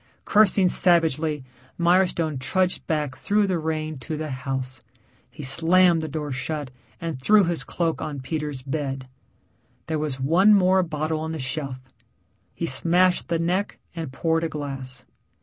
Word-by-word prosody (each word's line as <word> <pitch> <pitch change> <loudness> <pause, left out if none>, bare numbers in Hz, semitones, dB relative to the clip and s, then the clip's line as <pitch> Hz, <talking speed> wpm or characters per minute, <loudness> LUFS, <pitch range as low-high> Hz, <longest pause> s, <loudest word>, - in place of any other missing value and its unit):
Cursing 205 -3 +5
savagely, 160 -5 +3 0.3
Milestone 170 -4 +2
trudged 185 +7 0
back 150 -4 -1
through 205 +8 +1
the 185 -3 -1
rain 155 -2 -3
to 155 +5 -5
the 155 -1 -4
house. 130 -1 -5 0.5
He 150 - -10
slammed 165 +4 +5
the 155 - -4
door 150 -1 -4
shut 145 +1 -4 0.3
and 165 -6 -5
threw 210 +8 +5
his 170 -5 -1
cloak 165 +2 -2
on 150 -3 -4
Peter's 150 -1 -4
bed. 135 -2 -4 0.8
There 160 -1 -2
was 150 -3 -2
one 180 +10 +5
more 190 -1 +4
bottle 155 -2 -2
on 160 +1 -4
the - - -4
shelf; 130 -1 -4 0.8
he 170 - -3
smashed 175 +6 +2
the 170 0 0
neck 180 +5 -1 0.2
and 160 -5 -5
poured 165 +4 0
a 165 - -1
glass. 135 -4 -6
155 Hz, 150 wpm, -24 LUFS, 140-175 Hz, 0.8 s, Cursing